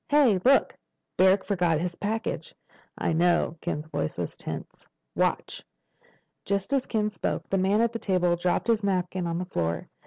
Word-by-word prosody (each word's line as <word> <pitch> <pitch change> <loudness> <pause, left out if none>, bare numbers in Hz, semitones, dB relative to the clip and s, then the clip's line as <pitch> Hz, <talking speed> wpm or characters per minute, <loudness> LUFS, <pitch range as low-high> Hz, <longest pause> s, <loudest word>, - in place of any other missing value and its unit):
"Hey—look! 270 -4 +4 0.4
Barrack 190 +1 +4
forgot 175 -6 +1
his 175 +1 -2
package." 220 +5 -3 0.4
"I - - 0
know." 170 -1 +2
Ken's 150 - -3
voice 80 - -3
was - - -4
tense. - - -8 0.3
"Watch." - - 0 0.8
Just 200 +6 -1
as 270 -2 +1
Ken 215 -2 0
spoke, 190 - -3
the 195 - +1
man 195 +4 +3
at 235 0 +1
the 230 - -3
table 180 -4 +2
dropped 175 +1 0
his 225 -2 +2
napkin 185 -2 -1
on 165 0 -2
the 180 - -3
floor. 85 - -2
185 Hz, 160 wpm, -27 LUFS, 175-215 Hz, 0.8 s, Hey—look